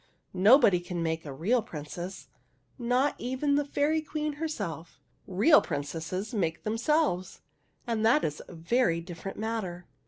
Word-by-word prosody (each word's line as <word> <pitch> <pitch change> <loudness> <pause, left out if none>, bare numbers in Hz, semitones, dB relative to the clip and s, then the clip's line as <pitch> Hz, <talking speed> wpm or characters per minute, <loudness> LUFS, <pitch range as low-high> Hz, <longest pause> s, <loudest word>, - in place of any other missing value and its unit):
'' - - -44 0.2
Nobody 235 -10 +7
can 175 -1 -4
make 160 -1 -2
a - - -5
real 195 - +1
princess, 175 0 -7 0.3
— - - -40 0.2
not 250 +4 +2
even 260 +4 -1
the 290 +1 +3
Fairy 290 +2 +1
Queen 305 0 -3
her 325 - +1
self. 165 - -6 0.3
Real 210 - +5
princesses 165 - -4
make 165 -6 -1
themselves, 225 - 0 0.4
and 230 -3 -1
that 240 +7 +4
is 150 - -2
a 180 - -11
very 170 +1 +1
different 175 +3 -8
matter." 205 -6 -3
205 Hz, 155 wpm, -29 LUFS, 170-260 Hz, 0.4 s, Nobody